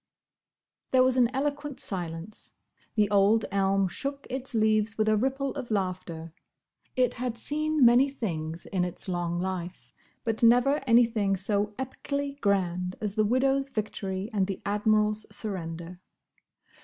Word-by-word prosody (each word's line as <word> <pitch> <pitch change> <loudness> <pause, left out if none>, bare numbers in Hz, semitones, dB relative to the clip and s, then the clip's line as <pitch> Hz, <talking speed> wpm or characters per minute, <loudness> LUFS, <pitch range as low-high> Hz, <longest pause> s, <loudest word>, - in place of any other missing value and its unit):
There 255 -1 +5
was 255 0 +3
an 245 -2 +4
eloquent 285 +1 -2
silence. 175 +1 -5 0.4
The 210 -2 +3
old 205 +2 +4
elm 195 0 +2
shook 275 +9 -4
its 260 0 -4
leaves 215 0 +2
with 215 0 +1
a 215 - +4
ripple 270 +4 -1
of 240 - -6
laughter. 180 -5 -3 0.6
It 255 -2 +2
had 245 -1 -3
seen 305 +2 +1
many 245 +4 +6
things 165 - -4
in 185 -2 -1
its 180 +2 -3
long 175 -1 -1
life, 185 -1 -5 0.3
but 225 -1 -1
never 245 +5 +5
anything 230 -4 +3
so 205 +2 -1
epically 280 +2 -4
grand 180 -3 0
as 210 -2 -3
the 215 0 +2
widow's 270 +4 +2
victory 205 -3 -4
and 195 -3 +1
the 195 - -4
Admiral's 210 +1 +1
surrender. 175 -4 -4
215 Hz, 140 wpm, -28 LUFS, 190-255 Hz, 0.6 s, many